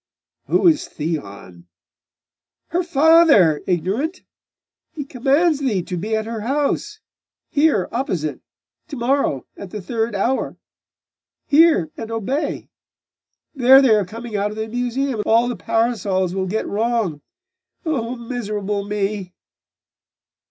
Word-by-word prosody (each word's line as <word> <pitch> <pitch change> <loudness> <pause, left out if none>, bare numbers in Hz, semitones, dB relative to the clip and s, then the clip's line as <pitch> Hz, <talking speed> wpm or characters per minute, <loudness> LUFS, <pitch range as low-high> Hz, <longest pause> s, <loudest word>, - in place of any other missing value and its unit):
'Who - - +3
is 315 -3 +3
Theon?' 100 - -6 1.0
'Her 350 +2 0
father, 315 - +5
ignorant! 200 - -1 0.7
He 290 -3 -5
commands 285 +4 +2
thee 225 -10 0
to 180 - -5
be 210 +6 -2
at 220 0 -2
her 225 -1 -5
house 295 - -1 0.5
here 290 - +2
opposite 180 - -2 0.5
to - - -7
morrow 245 - 0
at 200 - -9
the 210 - -6
third 225 +3 -2
hour. 240 +7 -1 0.9
Hear 290 - +4
and 225 -1 -6
obey! 230 +7 -3 0.8
There 265 -1 +7
they 265 -5 +5
are 210 -1 +3
coming 225 +4 -8
out 205 +1 0
of 210 - -8
the 220 0 -3
Museum, 245 +2 -2
and 210 - -3
all 230 +2 +4
the 245 - -2
parasols 200 -6 0
will 190 0 -2
get 220 +4 -2
wrong! 215 -8 -1 0.6
Oh, 255 -6 -2
miserable 210 -4 -3
me! 200 -2 -3
225 Hz, 125 wpm, -20 LUFS, 195-270 Hz, 1.0 s, There